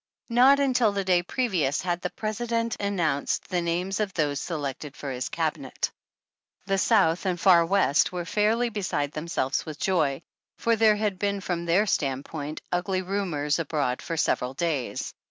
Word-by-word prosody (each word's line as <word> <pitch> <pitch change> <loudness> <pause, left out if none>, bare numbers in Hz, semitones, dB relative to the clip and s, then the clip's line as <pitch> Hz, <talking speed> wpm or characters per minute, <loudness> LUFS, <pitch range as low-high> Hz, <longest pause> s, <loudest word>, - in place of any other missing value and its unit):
Not 255 +4 +6
until 250 -5 +3
the 200 -1 -1
day 180 -2 +3
previous 175 - 0
had 175 -1 -1
the 180 - -2
President 230 +2 -2
an 200 -1 -1
nounced 155 -5 0
the 180 -2 0
names 180 +3 -1
of 210 -2 0
those 145 -3 0
selected 145 -3 -5
for 140 - -5
his 125 0 -3
Cabinet. - - -2 0.7
15 - - -36
i6 - - -36
The 195 0 +1
South 190 -5 +3
and 180 -2 -1
Far 175 -2 +6
West 190 -6 +3
were 175 -1 -4
fairly 220 +5 +1
beside 180 -9 -2
them 155 +2 -6
selves 135 -5 -1
with 155 -2 -7
joy, 160 -5 0 0.3
for 230 0 +2
there 220 -1 +5
had 205 -3 -1
been 200 0 0
from 175 -3 -3
their 175 +5 +3
stand 140 -8 -1
point 150 -1 -6
ugly 185 +1 0
rumors 175 -6 -1
abroad 145 -5 -1
for 165 - -4
several 130 -3 0
days. 150 -5 -2
180 Hz, 180 wpm, -26 LUFS, 150-205 Hz, 0.7 s, Not